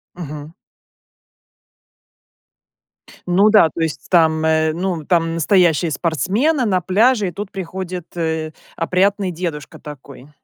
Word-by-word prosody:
Мгм. 155 Hz, -2 st, -8 dB, 2.7 s
Ну 195 Hz, +4 st, +4 dB
да, 210 Hz, -7 st, +5 dB
то 165 Hz, -, -6 dB
есть 160 Hz, -2 st, -3 dB
там, 160 Hz, -3 st, +3 dB
э, 160 Hz, 0 st, +2 dB
ну, 175 Hz, -3 st, -3 dB
там 165 Hz, -1 st, +1 dB
настоящие 170 Hz, -1 st, +2 dB
спортсмены 215 Hz, -, 0 dB
на 185 Hz, -3 st, +1 dB
пляже, 210 Hz, +4 st, +2 dB
и -, -, -9 dB
тут 200 Hz, +3 st, -7 dB
приходит, 185 Hz, -2 st, -6 dB
э, 160 Hz, -2 st, -2 dB, 0.2 s
опрятный 190 Hz, +2 st, 0 dB
дедушка 165 Hz, -4 st, -6 dB
такой. 140 Hz, -1 st, -12 dB
170 Hz, 115 wpm, -19 LUFS, 160-190 Hz, 2.7 s, да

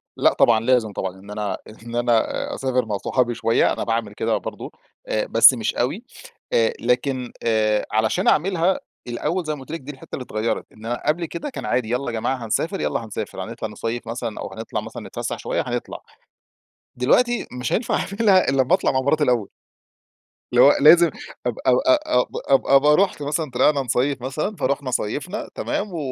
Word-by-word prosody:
لأ -, -, +3 dB
طبعًا، 115 Hz, -2 st, +4 dB
لازم 115 Hz, -2 st, +2 dB
طبعًا. 95 Hz, 0 st, -4 dB
إن 100 Hz, +2 st, -12 dB
أنا 105 Hz, -2 st, -3 dB, 0.3 s
إن 120 Hz, 0 st, -7 dB
أنا 120 Hz, -1 st, +3 dB, 0.3 s
أ -, -, -4 dB
أسافر 130 Hz, -2 st, 0 dB
مع 105 Hz, -2 st, -2 dB
صحابي 120 Hz, +4 st, 0 dB
شوية، 115 Hz, 0 st, +2 dB
أنا -, -, -3 dB
باعمل 115 Hz, -2 st, -2 dB
كده 110 Hz, +1 st, 0 dB
برضه، -, -, -7 dB, 0.4 s
آآ -, -, 0 dB
بس -, -, +7 dB
مش -, -, -2 dB
أوي. -, -, -1 dB, 0.5 s
آآ، 115 Hz, -1 st, +3 dB
لكن، 125 Hz, +1 st, 0 dB
آآ 110 Hz, -2 st, +2 dB
علشان 110 Hz, +1 st, +1 dB
أعملها 180 Hz, +2 st, +2 dB, 0.3 s
الأول 165 Hz, +9 st, -2 dB
زي 155 Hz, -, -1 dB
ما -, -, -11 dB
قلت 130 Hz, -, -11 dB
لِك، 165 Hz, -, -4 dB
دي 140 Hz, -, -7 dB
الحتة 135 Hz, -, -9 dB
اللي 130 Hz, -, -6 dB
اتغيرت، 110 Hz, -1 st, -2 dB
إن 110 Hz, -, -13 dB
أنا 120 Hz, +1 st, -3 dB
قبل 170 Hz, +3 st, +1 dB
كده 170 Hz, -, -5 dB
كان 255 Hz, -, -7 dB
عادي 120 Hz, -3 st, 0 dB
يالّا 125 Hz, +3 st, -1 dB
يا -, -, -1 dB
جماعة 115 Hz, +2 st, -2 dB
هنسافر، 165 Hz, -, -1 dB
يالّا 115 Hz, -, -1 dB
هنسافر. 105 Hz, -, -5 dB
هنطلع -, -, -5 dB
نصيف 115 Hz, +1 st, -5 dB
مثلًا 115 Hz, -1 st, -4 dB
أو -, -, -6 dB
هنطلع -, -, -4 dB
مثلًا -, -, -8 dB
نتفسح -, -, -4 dB
شوية، -, -, -1 dB
هنطلع. -, -, -4 dB, 1.0 s
دلوقتي 240 Hz, -, +2 dB
مش 125 Hz, -, -2 dB
هينفع 230 Hz, -, 0 dB
أعملها 200 Hz, -4 st, +2 dB
إلّا 135 Hz, 0 st, +3 dB
أما 130 Hz, +7 st, +1 dB
أطلع 185 Hz, -, +3 dB
مع 130 Hz, -, +1 dB
مراتي 150 Hz, +3 st, +2 dB
الأول. 120 Hz, -7 st, +1 dB, 1.0 s
اللي -, -, +6 dB
هو -, -, +8 dB
لازم 170 Hz, +2 st, +7 dB, 0.4 s
أب 125 Hz, -2 st, -1 dB
أو 125 Hz, 0 st, +5 dB
أ 125 Hz, -1 st, +2 dB, 0.5 s
أبقى 150 Hz, +2 st, +6 dB
رُحت 190 Hz, -4 st, +1 dB
مثلًا 150 Hz, 0 st, -2 dB
طلعنا 135 Hz, +3 st, +3 dB
نصيف 130 Hz, +2 st, 0 dB
مثلًا، 150 Hz, +11 st, -3 dB
فرُحنا 140 Hz, -2 st, -1 dB
صيفنا، 145 Hz, -, -3 dB
تمام، 200 Hz, -3 st, -3 dB
و -, -, -4 dB
125 Hz, 190 wpm, -22 LUFS, 115-150 Hz, 1.0 s, هو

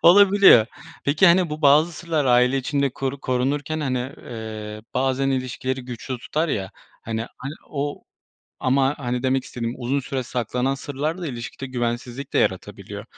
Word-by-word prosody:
olabiliyor. 195 Hz, -, +7 dB, 0.4 s
Peki, 150 Hz, +6 st, +4 dB
hani, 175 Hz, -1 st, +5 dB
bu 150 Hz, +1 st, -5 dB
bazı 150 Hz, +4 st, +5 dB
sırlar 160 Hz, -2 st, -1 dB
aile 125 Hz, +1 st, +4 dB
içinde 140 Hz, 0 st, 0 dB
koru 135 Hz, +2 st, -4 dB
korunurken, 140 Hz, +5 st, -1 dB
hani, 130 Hz, -4 st, 0 dB, 0.2 s
eee, 110 Hz, -2 st, -7 dB
bazen 135 Hz, +1 st, +1 dB
ilişkileri 130 Hz, 0 st, -2 dB
güçlü 125 Hz, +1 st, -5 dB
tutar, 155 Hz, +7 st, -1 dB
ya, 95 Hz, -7 st, -2 dB, 0.3 s
hani, 115 Hz, 0 st, -3 dB
a -, -, -16 dB, 0.4 s
o 145 Hz, 0 st, -3 dB, 0.6 s
ama, 135 Hz, +2 st, +2 dB
hani, 125 Hz, -2 st, -2 dB
demek 130 Hz, 0 st, +1 dB
istediğim 120 Hz, 0 st, -4 dB
uzun 130 Hz, +3 st, 0 dB
süre 135 Hz, 0 st, -3 dB
saklanan 125 Hz, +2 st, -1 dB
sırlar 145 Hz, +5 st, -3 dB
da 175 Hz, -, -4 dB
ilişkide 125 Hz, 0 st, -6 dB
güvensizlik 125 Hz, +1 st, -3 dB
de -, -, +2 dB
yaratabiliyor. -, -, -2 dB
130 Hz, 150 wpm, -23 LUFS, 125-145 Hz, 0.6 s, olabiliyor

